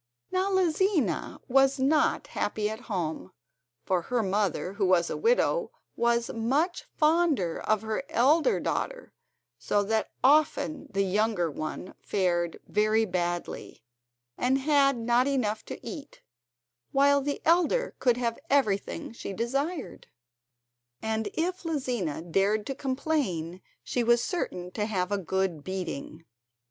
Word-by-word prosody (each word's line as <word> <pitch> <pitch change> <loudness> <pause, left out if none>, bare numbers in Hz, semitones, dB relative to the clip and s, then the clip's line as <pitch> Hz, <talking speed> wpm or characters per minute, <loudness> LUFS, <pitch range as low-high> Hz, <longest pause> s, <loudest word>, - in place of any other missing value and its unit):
Now 375 +1 +1
Lizina 360 - +1
was 270 +1 +4
not 280 +4 +2
happy 210 0 -2
at 220 - -6
home, 160 - -3 0.5
for 185 -2 +1
her 240 +5 -1
mother, 195 -1 0
who 200 -1 0
was 175 -2 +3
a - - -2
widow, - - +2 0.3
was 235 0 +1
much 275 +11 0
fonder 305 - +2
of 215 -1 0
her 220 +2 -2
elder 315 - +3
daughter; - - -3 0.5
so 205 0 +1
that 220 +1 0
often 295 +1 +3
the 195 -1 +1
younger 195 -3 +1
one 155 +5 -5
fared 175 -3 0
very 215 +2 +2
badly, 175 - -3 0.6
and 255 +2 +2
had 275 -1 +3
not 240 +3 +2
enough 220 -6 0
to - - -7
eat, 295 -4 -9 0.7
while 280 +1 +4
the 285 +1 -2
elder 355 +10 +3
could 245 -2 +3
have 235 -2 -1
everything 215 -9 0
she 225 -3 -6
desired, 275 - -3 0.9
and 220 0 -2
if 355 +3 -1
Lizina 245 - -2
dared 195 +5 +1
to 270 - -3
complain 255 - -2 0.2
she 245 - -1
was 235 0 +4
certain 180 - -3
to 210 +2 -2
have 185 -3 -1
a 205 - +1
good 190 -3 -1
beating. 165 -3 -5
230 Hz, 130 wpm, -28 LUFS, 190-285 Hz, 0.9 s, was